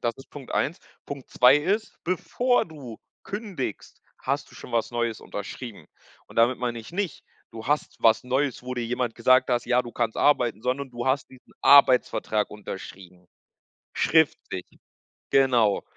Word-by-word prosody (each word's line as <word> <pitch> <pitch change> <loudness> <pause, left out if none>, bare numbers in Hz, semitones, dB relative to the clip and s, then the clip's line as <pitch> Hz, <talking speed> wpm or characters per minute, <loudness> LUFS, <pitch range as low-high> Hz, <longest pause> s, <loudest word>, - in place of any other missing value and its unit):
Das 115 -1 +1
ist 135 - -14
Punkt 140 -3 -10
1. 155 +5 0 0.3
Punkt 140 -2 -7
2 125 +2 +6
ist, 195 +9 -1
bevor 245 +8 +1
du 140 -9 -10 0.3
kündigst, 195 - -6 0.2
hast - - -2
du - - -17
schon - - -11
was 115 -1 0
Neues 120 -2 -2
unterschrieben. 105 +2 -8 0.4
Und - - -16
damit 120 +2 +4
meine 120 -1 -2
ich 110 - -10
nicht, 190 -4 -3 0.3
du 115 +1 -8
hast 150 +2 0
was 115 +2 +4
Neues, 130 0 -1
wo 125 0 -5
dir 120 - -2
jemand 120 0 -2
gesagt 130 +2 +4
hast: 120 -1 +1
„Ja, 125 0 +3
du 120 - -10
kannst 115 -2 -1
arbeiten“, 120 -7 +2
sondern 130 +2 -2
du 120 +1 -5
hast 135 +1 +1
diesen 130 -1 -18
Arbeitsvertrag 125 -6 +5
unterschrieben. 95 -3 -10 0.7
Schriftlich, 150 - +1 0.7
genau. 120 -6 +3
125 Hz, 160 wpm, -25 LUFS, 115-140 Hz, 0.7 s, 2